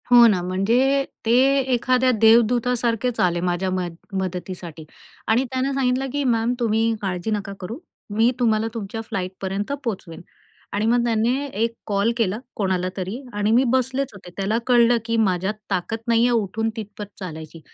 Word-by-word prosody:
हो 240 -1 +8
ना, 195 -5 +2
म्हणजे 235 +10 +2 0.2
ते 225 - +3 0.4
एखाद्या 255 +1 +3
देवदूतासारखेच 235 +1 +3
आले 175 -1 +2
माझ्या 180 +1 0
मद 180 -2 -2 0.3
मदतीसाठी. 175 -3 -6 0.4
आणि 230 +4 +3
त्यानं 260 +1 0
सांगितलं 265 0 0
की 285 0 0
मॅम 225 +2 0
तुम्ही 225 -1 +2
काळजी 185 +1 -2
नका 205 -1 -2
करू. 195 +6 -6 0.4
मी 225 +3 +4
तुम्हाला 220 -2 +2
तुमच्या 225 -1 -5
फ्लाइटपर्यंत 195 +1 -4
पोहचवेन. 190 -8 -5 0.5
आणि 205 +1 0
मग 240 +1 +3
त्याने 235 +4 +1
एक 225 +3 0 0.2
कॉल 205 +2 +1
केला 215 -3 +1 0.2
कोणालातरी. 185 0 -2 0.2
आणि 210 +1 +1
मी 240 +3 +5
बसलेच 260 +1 0
होते. 190 -3 -12
त्याला 200 +3 0
कळलं 240 -1 +5
की 230 0 -1
माझ्यात 190 +1 0 0.2
ताकद 195 +3 -1
नाहीये 235 +1 +4
उठून 225 0 0
तिथपर्यंत 210 -2 -8
चालायची. 160 -3 -8
220 Hz, 150 wpm, -22 LUFS, 190-240 Hz, 0.5 s, हो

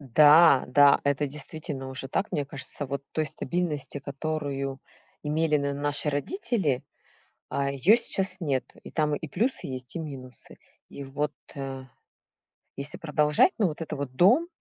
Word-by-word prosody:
Да, 150 -1 +8
да, 140 +2 +6
это 145 +1 +1
действительно 145 -1 -5
уже 130 0 -5
так. 195 - -1
Мне 145 - -1
кажется, 140 +1 -4
вот 140 0 -4
той 155 - 0
стабильности, 150 0 -3
которую 140 -1 -3 0.4
имели 150 0 +2
н 140 0 -2
наши 145 +1 0
родители, 175 - -1 0.7
а, 140 0 0
её 165 - +5
сейчас 195 -5 0
нету, 135 -6 -2
и - - -9
там 150 -2 +1
и 160 - -6
плюсы 180 - -1
есть, 130 +1 -7
и - - -2
минусы. 135 -5 -8 0.3
И 140 - -8
вот, 145 +2 -2 0.2
э, 135 -1 -5 0.9
если 140 +2 -6
продолжать, 150 - +3
но 200 - +4
вот 155 +1 -5
это 155 -1 -4
вот 140 -2 -5
дом, 245 - +5
145 Hz, 150 wpm, -27 LUFS, 140-160 Hz, 0.9 s, Да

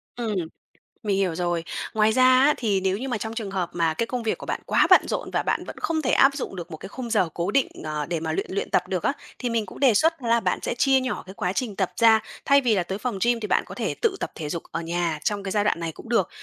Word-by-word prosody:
Ừm. 225 -4 -2 0.7
Mình 200 -2 +1
hiểu 185 -4 0
rồi. 175 -1 -1 0.3
Ngoài 215 0 +3
ra 255 +2 +3 0.2
á, 285 +3 +5
thì 205 -5 0
nếu 190 +1 +1
như 260 - -4
mà 245 -4 -1
trong 220 +1 -5
trường 220 -4 -4
hợp 185 -3 -2
mà 165 -2 +1
cái 230 - -1
công 245 0 -4
việc 220 - 0
của - - -9
bạn - - -3
quá - - +3
bận - - +6
rộn - - -3
và - - 0
bạn - - 0
vẫn - - -8
không 320 -1 -1
thể 260 - 0
áp 275 +1 +5
dụng 260 - -4
được 175 -1 -7
một 160 - -6
cái 190 - -9
khung 245 +2 -6
giờ 200 -7 +2
cố 175 +3 -2
định, 275 +4 +3 0.2
ờ, 150 -1 -3
để 170 0 -2
mà 160 0 -3
luyện 155 - -1
luyện 195 - -2
tập 180 0 +1
được 185 -3 -2
á, - - +2 0.3
thì 245 - -2
mình 230 -2 0
cũng 185 - -11
đề 265 -4 +5
xuất 320 +8 +2
đó 240 - -4
là 235 0 +4
bạn - - 0
sẽ - - -2
chia 270 +1 +4
nhỏ 255 -1 -3
cái 190 - -9
quá 180 -2 -2
trình 225 -3 -2
tập 190 -2 -1
ra. 225 -1 +7 0.3
Thay 280 0 +5
vì 235 -4 +2
là 185 - +1
tới 190 +3 -4
phòng 230 -1 -3
gym 240 -1 +2
thì 210 - -4
bạn - - +2
có - - -10
thể - - -2
tự 455 -5 +2
tập - - -3
thể 150 -3 -5
dục 170 - -4
ở 165 - -3
nhà 170 -1 -1
trong 205 -1 -1
cái 195 - -4
giai 205 +1 +2
đoạn 205 - +1
này 165 -1 -3
cũng 225 - -13
được. 230 -7 +2
205 Hz, 305 wpm, -24 LUFS, 175-240 Hz, 0.7 s, ra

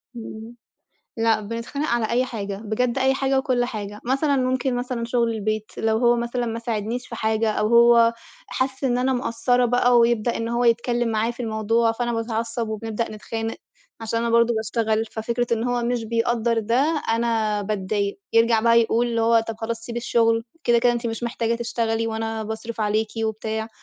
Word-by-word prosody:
إمم، 225 0 -8 0.6
لأ 225 -1 +2
بنتخانق 230 +8 -4
على 235 -2 0
أي 250 +2 +2
حاجة، 205 -5 -5
بجد 240 +4 0
أي 265 0 +3
حاجة 270 0 +1
وكلّ 255 -3 +1
حاجة، 210 -4 -6
مثلًا 275 +3 +1
ممكن 255 0 0
مثلًا 245 -1 -3
شُغل 235 0 +1
البيت 215 0 -3
لو 220 0 +1
هو 240 0 +4
مثلًا 240 +1 -2
ما 230 0 -3
ساعدنيش 230 +1 -3
في 235 - -7
حاجة 220 0 +1
أو 215 0 0
هو 235 0 +6 0.4
حس 265 +1 -2
إن 245 -1 +2
أنا 260 +1 +1
مقصّرة 245 -1 +1
بقى 245 0 +4
ويبدأ 235 0 +2
إن 230 0 -3
هو 240 +1 0
يتكلّم 235 +1 +2
معايا 225 +1 0
في 240 - -10
الموضوع، 225 +1 +1
فأنا 240 +1 -2
باتعصّب 230 0 -2
وبنبدأ 220 +1 -3
نتخانق 225 +1 -5 0.4
عشان 225 +1 -2
أنا 235 0 -1
برضه 235 0 +4
باشتغل، 220 0 0
ففكرة 235 +2 -2
إن 230 +1 0
هو 245 -1 0
مش 240 -1 -1
بيقدّر 230 0 0
ده، 265 +8 +1
أنا 225 -2 +1
باتضايق، 200 - -2
يرجَع 230 0 +4
بقى 230 +1 +5
يقول 230 +1 +1
هو 230 0 +4
طَب 225 - -4
خلاص 230 0 -3
سيبي 235 +1 -5
الشغل، 230 -1 +2 0.2
كده، 240 -1 +4
كده 240 +1 +3
أنتِ 235 0 -3
مش 225 +1 -4
محتاجة 235 -1 -1
تشتغلي 230 -1 -1
وأنا 225 0 -3
باصرِف 220 +1 -6
عليكِ 215 +1 +1 0.2
وبتاع، 220 0 -3
230 Hz, 180 wpm, -23 LUFS, 220-240 Hz, 0.6 s, هو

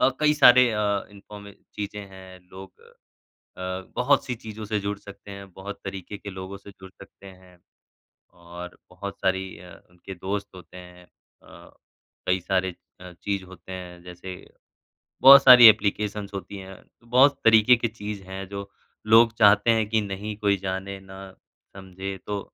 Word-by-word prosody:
और 130 0 +2
कई 150 0 +3
सारे 125 -4 +6
अ, 105 -2 -1
इन्फॉर्म 100 0 -13 0.2
चीज़ें 105 0 -6
हैं, 95 -1 -14
लोग 95 0 -13 0.8
अ, - - -9 0.3
बहुत-सी 135 0 +1
चीज़ों 110 -1 -9
से 105 0 -2
जुड़ 100 0 -4
सकते 100 0 -13
हैं, 100 -1 -11
बहुत 100 +2 -9
तरीके 95 +1 -7
के 100 - -9
लोगों 95 0 -8
से 100 - -15
जुड़ 95 -1 -15
सकते 100 0 -16
हैं। 90 -1 -17 0.8
और 85 +1 -11
बहुत 100 +2 -9
सारी 95 0 -2
अ, 90 0 -13 0.2
उनके 90 +2 -11
दोस्त 100 +3 -4
होते 90 0 -14
हैं 90 0 -14
अ, - - -20 0.6
कई 90 0 +2
सारे 95 0 -1 0.3
अ, 90 0 -11
चीज़ 100 +2 -4
होते 95 0 -14
हैं 90 -1 -9
जैसे, 90 +1 -9 0.9
बहुत 140 +1 +9
सारी 125 -2 +10
एप्लिकेशन्स 105 -1 +1
होती 100 +1 -7
हैं, 95 0 -10 0.3
तो 115 - -23
बहुत 135 +3 +4
तरीके 115 +2 +6
की 115 0 -1
चीज़ 105 -2 -7
है 95 +1 -8
जो 100 0 -8 0.4
लोग 115 +1 +5
चाहते 105 +2 +5
हैं 110 -2 +1
कि 110 -1 +1
नहीं 105 +1 -6
कोई 100 -2 +1
जाने, 95 +1 -5
ना 95 0 -12 0.4
समझे 95 0 -7
तो 105 -1 -3
100 Hz, 160 wpm, -24 LUFS, 95-105 Hz, 0.9 s, सारी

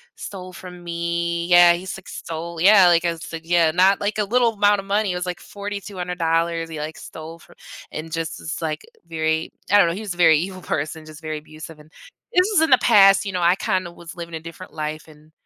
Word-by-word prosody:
stole 185 -2 -8
from 180 -1 -11
me. 170 0 -2
Yeah, 175 -1 +7
he 175 - -5
s 190 - -6
like 190 - -15
stole. 165 +1 -6
Yeah, 195 -1 +7
like 170 0 +4
I 170 -1 0
said, 165 0 -8
yeah, 170 -2 +3
not 185 +3 +3
like 205 +1 -1
a 210 - +1
little 235 +2 +2
amount 205 0 +3
of - - -16
money. 205 0 0
It - - -4
was 180 - -3
like 180 - -4
$4,200 180 -5 -3
he 155 -2 -6
like 155 +1 -5
stole 160 +1 -10
fro - - -19 0.4
and 160 +1 -7
just 165 -1 -4
this 160 - -5
like 155 -1 -3 0.2
very 160 0 -1 0.2
I 205 - +7
don't 200 -4 +6
know, 170 - -1
he 200 - -6
was 200 -4 -4
a - - -17
very 165 -3 +6
evil 185 +2 -5
person, 155 0 -4
just 155 0 -12
very 155 -1 -4
abusive. 155 +1 -12
And 150 +1 -18 0.4
this 365 -1 +4
was 345 - +4
in 320 - +2
the 255 - +8
past, 195 -4 +6
you 195 - -3
know, 180 - -1
I 175 +1 +4
kinda 185 -2 -2
was 170 -1 -12
living 170 -1 -7
a - - -4
different 170 +3 -11
life 155 0 -5
and 155 0 -19
170 Hz, 235 wpm, -22 LUFS, 160-190 Hz, 0.4 s, the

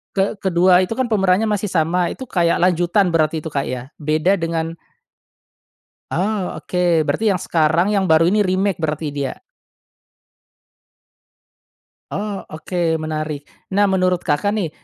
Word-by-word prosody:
ke 195 +1 0
kedua 180 0 +5
itu, 185 +4 -1
kan, 255 -2 -2
pemerannya 195 -1 +3
masih 210 -2 0
sama. 175 0 +1
Itu - - -6
kayak 175 -8 +1
lanjutan 175 +1 +2
berarti 160 -1 +1
itu, 160 - -6
Kak, 140 -1 -2
ya? 130 +2 -6
Beda 155 +6 +1
dengan 165 0 -3 1.4
Oh, 195 +2 -2
oke. 175 -2 +1
Berarti 160 +8 +1
yang 180 - -3
sekarang 165 +3 +2
yang 200 -2 +1
baru 165 0 +4
ini 210 +1 +2
remake 190 0 0
berarti 155 -1 -2
dia? 140 -2 -4 2.7
Oh, 205 0 -3 0.2
oke, 160 0 -1
menarik. 155 -2 -4 0.2
Nah, 205 +1 +3
menurut 185 -2 +1
Kakak, 200 +8 0
nih, 200 -7 -1
175 Hz, 140 wpm, -20 LUFS, 160-195 Hz, 2.7 s, kedua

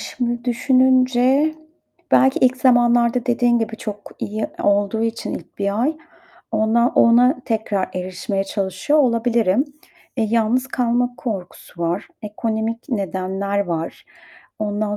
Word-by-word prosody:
şimdi 240 -1 -3
düşününce 255 +3 +3 0.6
belki 265 0 +4
ilk 255 0 +3
zamanlarda 240 -1 +3
dediğin 240 -1 +2
gibi 225 -1 -3
çok 210 -4 -7
iyi 215 +1 -3 0.2
olduğu 205 +2 +1
için 230 0 -3
ilk - - -11
1 200 +1 -1
ay 305 +4 0 0.6
ona 230 +2 +2
ona 250 +4 +4
tekrar 215 -4 -1
erişmeye 185 +3 -3
çalışıyor 195 +8 -1
olabilirim. 235 -3 +2 0.5
Eee, 230 - +1
yalnız 235 +3 +1
kalma 245 0 0
korkusu 185 -6 -6
var, 170 +4 -2
ekonomik 220 +3 -3
nedenler 195 -3 -2
var. 165 -1 -4 0.5
Ondan 210 0 -2
230 Hz, 115 wpm, -20 LUFS, 205-245 Hz, 0.6 s, belki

